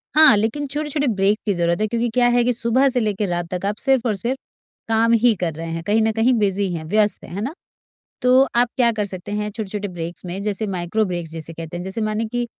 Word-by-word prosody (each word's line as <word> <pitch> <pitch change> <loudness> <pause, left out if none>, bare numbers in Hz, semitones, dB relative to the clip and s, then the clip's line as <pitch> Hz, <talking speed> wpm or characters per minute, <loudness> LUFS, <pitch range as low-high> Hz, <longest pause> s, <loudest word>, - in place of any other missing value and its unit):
हाँ, 310 -7 +8
लेकिन 230 +8 -1
छोटे-छोटे 295 0 -2
ब्रेक 200 +2 +2
की 205 - +1
जरूरत 170 +1 0
है, 215 - +2
क्योंकि 235 +2 -1
क्या 245 +2 +3
है 245 - +4
कि 245 +1 +2
सुबह 240 +4 +2
से 255 -1 0
लेकर 210 -2 -1
रात 175 -1 -2
तक 180 +1 -3
आप 205 +1 0
सिर्फ 265 -3 +2
और 220 -3 +1
सिर्फ 240 +7 -2 0.5
काम 225 +1 +3
ही 230 +1 +5
कर 175 -4 -2
रहे 165 +2 -6
हैं, 165 0 -4
कहीं 210 +5 +2
न 220 0 +2
कहीं 225 +4 +2
बिजी 200 -2 +1
हैं, 160 - -4
व्यस्त 210 +4 +1
हैं, - - -11
है 200 - -3
ना? 265 +8 -3 0.7
तो 250 +1 +6
आप 240 0 +4
क्या 240 -2 +4
कर 215 -2 -1
सकते 190 0 -7
हैं 210 0 -2
छोटे-छोटे 210 -1 -4
ब्रेक्स 175 0 -7
में 180 +3 -5
जैसे 210 +1 -2
माइक्रो 190 +3 -1
ब्रेक्स 175 -4 -4
जिसे 165 0 -8
कहते 165 +1 -7
हैं 175 - -5
जैसे 190 +4 -4
माने 215 +1 -1
कि 245 0 -1
210 Hz, 250 wpm, -21 LUFS, 185-235 Hz, 0.7 s, हाँ